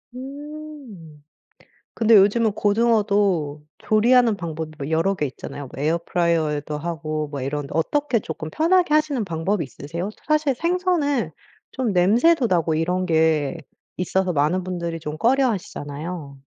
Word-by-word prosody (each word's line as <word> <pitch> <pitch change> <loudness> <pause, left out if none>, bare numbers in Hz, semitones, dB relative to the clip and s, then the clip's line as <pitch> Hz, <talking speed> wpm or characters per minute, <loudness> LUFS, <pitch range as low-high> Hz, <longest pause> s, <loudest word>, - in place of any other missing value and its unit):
음. 275 - -10 0.7
근데 225 -1 +5
요즘은 210 +3 +4
고등어도 205 -8 +1 0.2
조리하는 230 0 +3
방법이 160 -3 -5
뭐 140 +2 -5
여러 165 +5 +2
개 150 -6 -1
있잖아요. 135 +1 -8
뭐 135 - -6
에어프라이어에도 160 -2 0
하고 155 -1 -3
뭐 145 -1 -5
이런데 140 +2 -3
어떻게 245 - +1
쪼끔 160 -4 -6
편하게 340 - +2
하시는 295 -7 +1
방법이 170 +2 -1
있으세요? 165 - -6 0.2
사실 305 -3 +2
생선은 330 - 0 0.4
좀 250 -6 -1
냄새도 235 - +4
나고 165 -3 +1
이런 180 +3 0
게 160 -2 +2 0.4
있어서 185 +1 0
많은 160 +5 +1
분들이 170 -2 -4
좀 150 -1 -6
꺼려하시잖아요. 170 - -1
180 Hz, 320 characters per minute, -22 LUFS, 155-240 Hz, 0.7 s, 근데